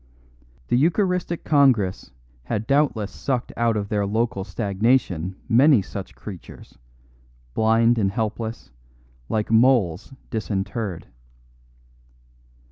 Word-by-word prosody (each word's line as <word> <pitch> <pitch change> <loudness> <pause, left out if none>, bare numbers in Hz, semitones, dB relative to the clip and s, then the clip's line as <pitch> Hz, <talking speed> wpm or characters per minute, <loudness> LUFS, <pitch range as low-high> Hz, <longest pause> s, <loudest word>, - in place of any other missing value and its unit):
The - - +3
Eucharistic 175 - 0
Congress 130 -11 +2 0.4
had 110 - -2
doubtless 135 -7 +1
sucked 130 -3 -3
out 115 -2 +1
of 100 -1 -3
their 105 -1 0
local 110 -1 -1
stagnation 100 -2 0
many 125 -1 +5
such 95 0 -8
creatures, 95 - -11 0.7
blind 115 - +3
and 95 -2 +1
helpless, 110 - -4 0.6
like 110 0 -1
moles 115 - +3 0.2
disinterred. 105 -3 -3
110 Hz, 95 wpm, -23 LUFS, 100-125 Hz, 0.7 s, many